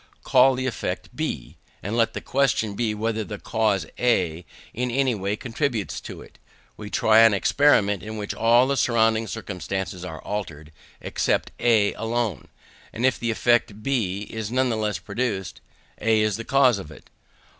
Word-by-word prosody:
Call 130 0 +5
the 130 +1 -3
effect 130 - -4
B, - - -4 0.3
and 105 +4 -3
let 115 -1 +2
the - - -5
question 125 -6 +1
be 110 0 -1
whether 110 +1 -1
the 105 0 -7
cause 105 -5 0
A 90 -9 +1 0.3
in 125 +1 -2
any 130 +1 +1
way 100 -1 -2
contributes 120 -2 -3
to - - -9
it. - - -19 0.4
We 105 -1 -8
try 110 +1 +4
an 115 -2 +6
experiment 105 -4 +3
in 110 +1 -7
which 105 -1 -4
all 120 +2 +4
the 140 +1 0
surrounding 115 -2 +2
circumstances 95 -3 -5
are 80 -4 -7
altered, 80 -7 -5 0.3
except - - -1
A 110 -4 +3
alone: 115 - -2 0.4
if 125 +2 0
the 115 - -2
effect 110 -2 +1
B 105 -8 -1
is 110 -2 -4
nevertheless 115 -5 0
produced, 100 -3 -4 0.4
A 110 0 +2
is 110 -2 +1
the 115 - -6
cause 130 -6 +4
of 75 - -9
it. 75 - -15
110 Hz, 160 wpm, -24 LUFS, 100-120 Hz, 0.4 s, an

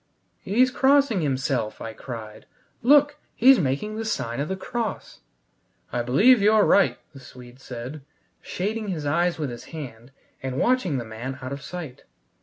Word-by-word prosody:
"He's 250 +6 +2
crossing 270 -6 +3
himself!" 130 -5 -1
I 115 - -6
cried. 110 -2 -9 0.3
"Look, 290 +3 +5 0.2
he's 260 +2 +6
making 170 +9 -2
the 225 - -3
sign 130 - -3
of 145 - -1
the 190 - -2
cross!" 220 +3 -5 0.7
"I 120 - 0
believe 205 - +5
you're 210 +1 +5
right," 200 - +4 0.2
the 135 - -11
Swede 125 -1 -14
said, 130 +3 -8 0.4
shading 215 +4 -3
his 165 -6 -3
eyes 170 +4 +1
with 150 -5 -3
his 120 +1 -9
hand 125 -7 -9 0.3
and 130 -1 -4
watching 240 - +1
the 120 - -4
man 120 +4 -6
out 130 +1 -4
of 140 - -7
sight. 160 -5 -8
150 Hz, 160 wpm, -24 LUFS, -, 0.7 s, he's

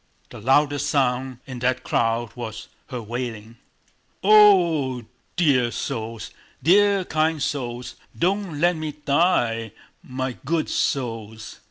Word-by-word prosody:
The - - -10
loudest 145 +3 +2
sound 130 -2 0
in 130 -2 -7
that 130 +1 0
crowd 115 0 0
was 110 -3 -7 0.2
her 125 -4 -6
wailing. 115 -1 -6 0.7
"Oh 180 -10 +5
h 120 - -9
h! - - -23 0.3
Dear 135 -8 +3
souls, 115 -3 -5 0.3
dear 200 +2 +4
kind 155 0 0
souls! 125 -4 -4 0.2
Don't 185 -3 -1
let 175 +2 +3
me 155 -1 -4
die! 140 - +1 0.3
My 130 -1 -4
good 160 +3 -1
souls!..." 110 -4 -3
130 Hz, 125 wpm, -23 LUFS, 120-160 Hz, 0.7 s, Oh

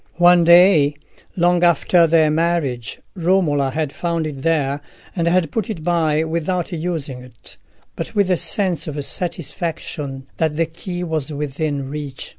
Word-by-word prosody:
One 175 0 +6
day, 170 -4 +6 0.4
long 175 0 +2
after 170 0 +4
their 160 -1 +4
marriage, 155 -7 -1
Romola 165 -6 +1
had 150 +1 -3
found 170 -2 -2
it 145 -3 -6
there, 145 -3 0 0.3
and 170 -2 0
had 175 -1 +2
put 225 -3 -2
it 175 -8 -5
by, 160 -3 +1
without 170 +3 -2
using 160 -6 -4
it, 125 -2 -13 0.4
but - - -6
with 200 -3 +2
a - - +4
sense 180 -4 -1
of 145 -2 -4
satisfaction 160 -5 -4
that 160 -2 0
the 165 - +2
key 175 +2 -6
was 160 -3 -3
within 145 -1 -3
reach. 145 -2 -6
160 Hz, 150 wpm, -20 LUFS, 145-175 Hz, 0.4 s, One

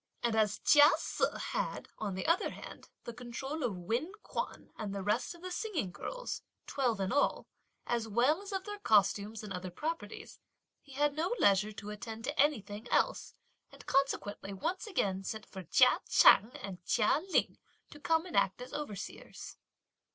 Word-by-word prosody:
And 235 -2 +1
as 215 -2 +2
Chia 295 0 +7
Se - - -3 0.3
had, - - -2
on 205 -3 -3
the 190 - -4
other 335 +3 +2
hand, - - -10
the 235 - -6
control 250 +6 -5
of 230 -8 -1
Wen 235 - -2
Kuan - - -5
and 205 -2 -5
the 195 - -3
rest 225 - 0
of 340 - -16
the 365 - -5
singing 360 - -2
girls, - - -5 0.2
twelve 245 -6 0
in 190 -1 -1
all, 285 +1 +1 0.4
as 235 -2 -1
well 250 - +2
as 405 - -8
of 385 -1 -2
their 415 0 -6
costumes 210 - +2
and 205 -2 -6
other 185 0 -5
properties, 240 - -5 0.4
he 275 - -15
had 290 +1 +2
no 340 +9 0
leisure 200 - +4
to 205 0 -7
attend 220 +2 -7
to 290 +4 -4
anything 220 -6 +1
else, - - +1 0.4
and - - -14
consequently 235 -7 0
once 340 - -3
again 195 - -1
sent 220 +2 -5
for 190 - -9
Chia 250 - +5
Ch'ang 205 +3 +7
and 185 -3 -7
Chia 230 - +2
Ling - - +1 0.3
to 295 - -11
come 325 +2 +1
and 360 - -7
act 195 +1 +2
as 250 +1 -9
overseers. 215 -10 -7
235 Hz, 175 wpm, -32 LUFS, 205-300 Hz, 0.4 s, Chia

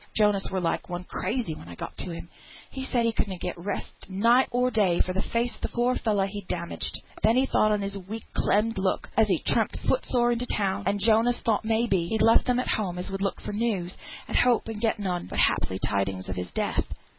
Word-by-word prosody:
Jonas 210 -2 +3
were 190 - 0
like 170 0 -1
one 175 0 -4
crazy 205 +1 -2
when 85 - -11
I 85 - -9
got - - -7
to 180 - -3
him; 170 +1 -8 0.4
he 265 - -5
said 245 -3 +1
he 230 - +3
could 220 - -1
na 190 -2 -5
get - - -3
rest 195 +3 -6
night 230 +7 +4
or 250 +1 +1
day 195 -6 +2
for 185 - +1
th' 190 - -1
face 235 +1 -1
of - - -12
the - - -1
poor 245 +1 +1
fellow 210 -5 +1
he 200 +1 -5
had 190 - -13
damaged; 170 -1 -2 0.2
then 225 +2 +4
he 260 - +4
thought 215 -4 +3
on 210 -1 +1
his 200 0 -3
weak, 205 +4 -7
clemmed 215 0 +2
look, 190 -1 -1
as 220 0 +4
he 185 -4 +2
tramped, - - +1
foot - - +2
sore, 240 -1 +3
into 240 +1 -1
town; 200 -1 -1
and 200 +1 +1
Jonas 225 +3 +4
thought, 225 -2 +1
may 225 +1 +2
be, 185 -7 +1
he 220 - -1
had 220 - +2
left 225 - +5
them 250 -1 +2
at 250 - -2
home 185 -5 -1
as 180 +2 -4
would 195 0 -4
look 195 - -1
for - - -5
news, 205 -5 -1 0.3
and - - -4
hope 245 -2 +3
and 220 -2 -5
get 225 -1 +1
none, 185 -4 -2
but, - - -6
haply, 95 - +2
tidings 95 -1 -1
of 95 - -3
his 90 -1 -5
death. - - -1
205 Hz, 250 wpm, -27 LUFS, 185-230 Hz, 0.4 s, left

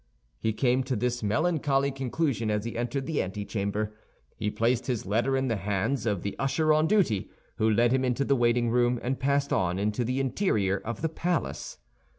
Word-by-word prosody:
He 110 - 0
came 125 +3 +2
to 130 -1 -1
this 120 +2 -1
melancholy 140 +3 +1
conclusion 130 -3 -1
as 105 0 -1
he 115 - -4
entered 125 +3 -2
the 155 +1 0
antechamber. 105 +2 -3 0.4
He 105 - -2
placed 115 +3 0
his 125 -4 -1
letter 120 +7 +1
in 130 0 0
the 115 -3 0
hands 105 +5 -1
of 100 -5 -1
the 100 - -3
usher 155 +3 +2
on 155 +1 +3
duty, 175 - +2 0.3
who 110 - +2
led 115 +2 +3
him 130 0 +2
into 130 +2 0
the 140 - +3
waiting 120 -1 +2
room 120 0 +2
and 130 +2 -1
passed 140 +1 +1
on 90 0 +1
into 105 +4 0
the 125 +3 -1
interior 120 - +1
of 115 +7 -6
the 160 - +2
palace. 170 0 -2
120 Hz, 190 wpm, -28 LUFS, 105-135 Hz, 0.4 s, on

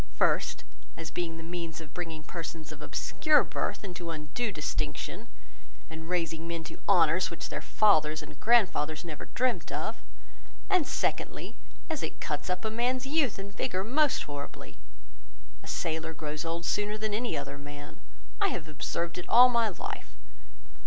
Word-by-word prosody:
First, - - +2 0.3
as 165 -1 -5
being 165 -2 -2
the 165 - -7
means 170 -1 -4
of 160 -3 -10
bringing 165 -3 -4
persons 165 -1 -6
of 155 -1 -9
obscure 300 - +3
birth - - -2
into 175 -3 -5
undue 165 - -2
distinction, 150 -6 -2 0.6
and 160 +1 -7
raising 165 -2 0
men 170 -1 -3
to 155 - -9
honours 170 -2 +5
which 170 - -5
their - - -3
fathers 155 -8 +4
and - - -11
grandfathers 180 -10 +3
never 155 -3 -6
dreamt 240 -7 0
of; - - -2 0.7
and 365 -6 +4
secondly, - - -1 0.3
as 320 -3 -2
it - - -4
cuts 150 +4 -2
up 180 +4 -1
a 220 - 0
man's 250 +3 +1
youth 280 -4 +2
and 200 0 -7
vigour 185 +1 0
most 280 +6 +3
horribly; 145 -1 -7 0.9
a - - -13
sailor 160 0 -1
grows 150 0 -3
old 165 +1 -2
sooner 210 +1 +1
than 215 -1 -1
any 235 +3 0
other 140 +1 -4
man. 145 0 -9 0.4
I - - +6
have 165 -3 -3
observed 165 +4 -2
it 180 - -8
all 250 +2 +9
my 235 -2 +3
life. 185 - -6
170 Hz, 160 wpm, -30 LUFS, 155-215 Hz, 0.9 s, all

